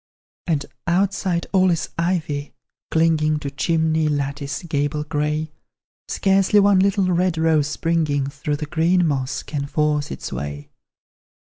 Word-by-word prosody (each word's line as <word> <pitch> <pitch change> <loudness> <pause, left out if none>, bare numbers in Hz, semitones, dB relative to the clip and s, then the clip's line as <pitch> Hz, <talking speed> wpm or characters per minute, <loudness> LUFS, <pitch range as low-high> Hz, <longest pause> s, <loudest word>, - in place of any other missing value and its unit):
And 150 -4 0 0.2
outside 185 -1 +1
all 185 -1 +4
is 170 -2 0
ivy, 160 -4 -2 0.3
clinging 160 -1 +2
To 145 -2 -5
chimney, 160 +1 +1
lattice, 140 0 -2
gable 150 -2 -1
grey; 150 +1 -2 0.6
Scarcely 195 +1 +3
one 200 -1 +5
little 195 0 +2
red 180 -1 +1
rose 160 -2 +2
springing 150 -3 0
Through 145 +1 -3
the 150 - -4
green 170 +3 +2
moss 140 -3 -1
can 140 -2 -4
force 150 0 0
its - - -6
way. 70 +3 -6
155 Hz, 130 wpm, -22 LUFS, 145-175 Hz, 0.6 s, one